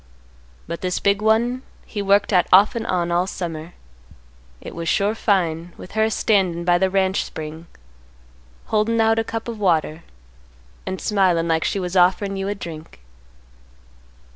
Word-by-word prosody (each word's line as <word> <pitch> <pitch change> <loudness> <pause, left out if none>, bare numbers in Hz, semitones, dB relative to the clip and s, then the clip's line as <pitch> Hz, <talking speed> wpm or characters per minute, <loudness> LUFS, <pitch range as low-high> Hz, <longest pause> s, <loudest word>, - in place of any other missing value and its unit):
But 170 0 -6
this 180 -1 -1
big 200 +1 +1
one 235 +4 +2 0.2
he 210 - -5
worked 200 +1 +2
at 180 -2 +4
off 200 +3 +6
and 230 -1 -3
on 175 -2 0
all 175 +2 +1
summer. 165 -2 -6 0.8
It - - -9
was 165 -1 -4
sure 205 +1 +1
fine, 175 -6 0
with - - -11
her 220 0 +2
a - - 0
standin' 185 -6 +1
by 175 0 +3
the 190 0 +2
ranch 190 0 +1
spring, 160 +2 -8 1.0
holdin' 220 +1 +1
out 225 0 +3
a - - +1
cup 225 +1 -5
of 230 -2 -6
water, 165 -4 +1 0.9
and 190 - -3
smilin' 185 -5 +1
like 160 -1 +1
she 200 - -1
was 180 0 -4
offerin' 190 +2 +3
you 195 0 -3
a 205 - -2
drink." 160 - -9
190 Hz, 165 wpm, -21 LUFS, 170-210 Hz, 1.0 s, off